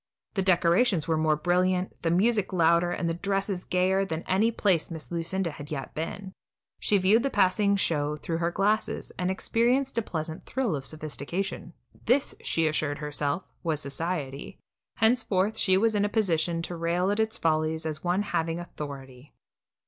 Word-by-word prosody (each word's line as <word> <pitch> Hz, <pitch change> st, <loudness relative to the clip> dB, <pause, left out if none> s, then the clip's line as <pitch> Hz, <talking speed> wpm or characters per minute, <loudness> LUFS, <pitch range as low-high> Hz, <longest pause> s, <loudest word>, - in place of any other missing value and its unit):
The 195 Hz, -, 0 dB
decorations 180 Hz, 0 st, +3 dB
were 165 Hz, -, +2 dB
more 155 Hz, -1 st, +2 dB
brilliant, 180 Hz, +3 st, +1 dB
the 165 Hz, -, 0 dB
music 205 Hz, +4 st, +2 dB
louder, 170 Hz, -1 st, +3 dB
and 175 Hz, -1 st, -2 dB
the 165 Hz, -, 0 dB
dresses 195 Hz, +1 st, -2 dB
gayer, 185 Hz, +2 st, +2 dB
than 165 Hz, -4 st, -3 dB
at -, -, -16 dB
any 215 Hz, +4 st, +3 dB
place 195 Hz, -7 st, +1 dB
Miss 160 Hz, -6 st, -8 dB
Lucinda 170 Hz, +1 st, -1 dB
had 145 Hz, 0 st, -9 dB
yet 135 Hz, -3 st, -5 dB
been. 190 Hz, +5 st, -5 dB, 0.5 s
She 205 Hz, -, +2 dB
viewed 200 Hz, +5 st, +4 dB
the 275 Hz, -, 0 dB
passing 200 Hz, -1 st, +3 dB
show 150 Hz, -6 st, 0 dB
through 165 Hz, +2 st, -3 dB
her 170 Hz, 0 st, +1 dB
glasses, 205 Hz, +5 st, 0 dB
and 180 Hz, 0 st, 0 dB
experienced 240 Hz, +7 st, +1 dB
a -, -, 0 dB
pleasant 160 Hz, -5 st, -5 dB
thrill 250 Hz, -10 st, 0 dB
of 135 Hz, -1 st, -5 dB
sophistication. 165 Hz, +4 st, -4 dB, 0.3 s
This, 260 Hz, +4 st, +2 dB
she 165 Hz, -, 0 dB
assured 150 Hz, -1 st, -1 dB
herself, 150 Hz, +2 st, -1 dB, 0.2 s
was 160 Hz, -4 st, -1 dB
society; 145 Hz, +1 st, -4 dB, 0.4 s
henceforth 220 Hz, -3 st, +2 dB
she 190 Hz, -3 st, +3 dB
was 220 Hz, +2 st, +2 dB
in 205 Hz, -1 st, +2 dB
a 205 Hz, -, +1 dB
position 170 Hz, -6 st, 0 dB
to 175 Hz, -, -4 dB
rail 170 Hz, +3 st, 0 dB
at 205 Hz, -, -1 dB
its 220 Hz, +1 st, 0 dB
follies 160 Hz, 0 st, 0 dB
as 155 Hz, -1 st, -4 dB
one 180 Hz, +3 st, +1 dB
having 165 Hz, -4 st, -1 dB
authority. 140 Hz, -5 st, -9 dB
175 Hz, 170 wpm, -27 LUFS, 160-200 Hz, 0.5 s, viewed